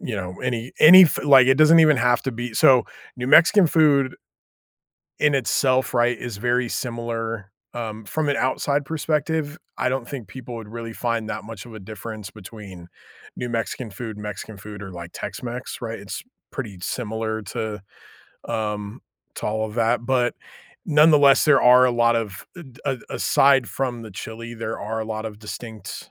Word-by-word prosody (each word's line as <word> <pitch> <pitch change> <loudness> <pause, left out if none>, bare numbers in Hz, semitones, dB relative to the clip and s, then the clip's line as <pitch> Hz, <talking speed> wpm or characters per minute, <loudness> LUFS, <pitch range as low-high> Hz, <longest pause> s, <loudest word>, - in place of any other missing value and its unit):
you 120 - -5
know, 90 -2 -5
any 120 -1 -3
any 185 +4 +10
f 170 - +3
like, 135 -3 +7
it 135 - +6
doesn't 155 +2 +7
even 155 -3 +5
have 120 0 +2
to 135 - -2
be 120 -1 -6
so, 125 0 +5 0.3
New 125 0 -4
Mexican 170 +7 +6
food 145 -5 +3 1.1
in 150 -1 +3
itself, 130 0 +1
right, 120 +1 +3
is 115 -2 -7
very 120 +2 0
similar, 115 -4 -4 0.2
um, 110 -2 -6
from 155 +7 -2
an 140 - +1
outside 140 +2 0
perspective, 155 -1 -2 0.2
I - - 0
don't 130 -2 -3
think 130 -8 -7
people 125 +3 -9
would 115 -2 -8
really 115 +1 -7
find 115 -2 -2
that - - -5
much 110 0 -9
of 120 - -12
a 110 - -9
difference 110 +1 -8
between 100 -4 -12 0.5
New 125 - -5
Mexican 115 +1 -3
food, 110 +1 -7
Mexican 105 0 -7
food, 105 0 -10
or, 95 - -8
like, 85 -1 -8
Tex-Mex, 125 +1 -6
right? 115 -1 -5
It's 100 0 -7 0.3
pretty 110 -8 -6
similar 110 +1 -3
to, 105 +1 -5 0.7
um, 105 -2 -4 0.4
to - - -4
all 110 +1 -1
of 105 - -10
that, 115 0 +1
but 125 -1 +1 0.5
nonetheless, 150 -3 +5
there 150 -2 +5
are 125 +1 +7
a - - +2
lot 120 -1 +2
of 105 -4 -5
d 160 -9 -12
a 135 -3 -1
aside 135 -2 +3
from 125 -3 -3
the 110 - -10
chili, 115 +4 -8
there 115 -1 -5
are 110 +2 -4
a - - -3
lot 110 0 -4
of 105 -2 -7
distinct 110 0 -9
120 Hz, 175 wpm, -22 LUFS, 110-135 Hz, 1.1 s, any